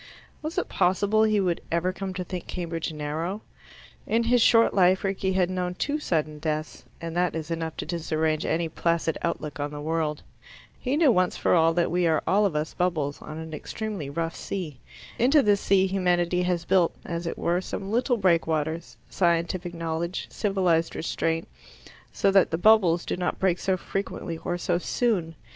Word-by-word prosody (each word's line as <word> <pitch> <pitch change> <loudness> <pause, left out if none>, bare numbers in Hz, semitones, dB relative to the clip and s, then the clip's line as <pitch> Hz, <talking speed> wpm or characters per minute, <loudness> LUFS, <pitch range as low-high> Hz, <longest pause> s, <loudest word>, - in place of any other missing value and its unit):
Was 310 +3 -5
it 365 - 0
possible 200 +4 +2
he 215 -1 +3
would 180 -3 0
ever 170 +2 +1
come 195 0 -4
to 180 - -2
think 180 0 -6
Cambridge 165 -2 -3
narrow? 160 +6 -4 0.6
In 230 +1 +2
his 240 +1 +3
short 230 0 +5
life 185 0 +4
Rickie 195 -1 -1
had 185 -1 +2
known 180 -1 -2
two 290 +9 -1
sudden 155 - -1
deaths, 155 -4 -3
and 165 0 -6
that 180 -1 +1
is 160 0 -4
enough 165 -1 -3
to - - -4
disarrange 160 -2 -1
any 165 +1 0
placid 165 0 0
outlook 150 -1 -3
on 145 +1 -1
the 145 0 -7
world. 155 0 -2 0.6
He 265 +3 -1
knew 310 -5 +5
once 185 -4 +1
for - - +2
all 165 -1 +4
that 175 -1 +1
we 175 0 +2
are 160 -2 +2
all 205 +2 +3
of 170 - -5
us 150 +1 -2
bubbles 155 -6 -1
on 155 - -8
an 160 0 -7
extremely 200 -2 -5
rough 165 +3 -3
sea. 160 -9 -5 0.4
Into 275 +4 +5
this 205 -2 +3
sea 190 -1 +3
humanity 180 -2 +1
has 180 -1 -1
built, 185 -3 +3
as 170 0 -4
it - - -4
were, 175 +2 0
some 195 +1 -5
little 245 +2 +2
breakwaters 160 - 0
scientific 170 +3 0
knowledge, 165 +2 -3
civilized 185 -5 +1
restraint 165 0 -1 0.6
so 195 - +2
that 195 -1 +5
the 165 - -1
bubbles 180 -3 +4
do - - -2
not 180 0 -1
break 185 -2 +1
so 190 -1 0
frequently 180 -3 -4
or 175 +1 -2
so 175 0 0
soon. 180 -6 0
175 Hz, 185 wpm, -26 LUFS, 165-195 Hz, 0.6 s, short